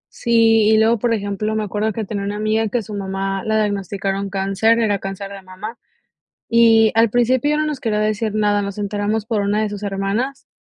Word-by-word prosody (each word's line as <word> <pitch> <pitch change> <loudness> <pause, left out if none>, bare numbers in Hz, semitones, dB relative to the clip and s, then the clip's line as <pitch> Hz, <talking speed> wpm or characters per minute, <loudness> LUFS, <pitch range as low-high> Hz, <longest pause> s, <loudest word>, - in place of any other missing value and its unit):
Sí, 225 -2 +3
y 220 - +5
luego 225 +1 +3
por 235 +2 0
ejemplo 205 +1 -3
me 215 - 0
acuerdo 210 +2 -1
que 220 +1 -4
tenia 200 0 -4
una 200 +1 -3
amiga 215 +1 0
que 230 - -1
a - - -1
su 210 - -9
mamá 195 -1 -3
la 220 0 +1
diagnosticaron 200 -1 -2
cáncer, 195 +4 +1
era 210 -3 +1
cáncer 195 +1 -6
de 200 -1 -9
mamá, 190 +5 -9 0.7
y 225 -1 +5
al 225 0 +4
principio 255 +5 +2
no 305 - 0
nos 300 -3 -3
quería 220 -4 -1
decir 215 +1 -1
nada, 205 -1 +2
nos 200 0 -5
enteramos 205 +1 -2
por 225 -3 0
una 205 +1 0
de 215 - 0
sus 205 0 -7
hermanas 205 +7 -2
210 Hz, 210 wpm, -19 LUFS, 200-225 Hz, 0.7 s, y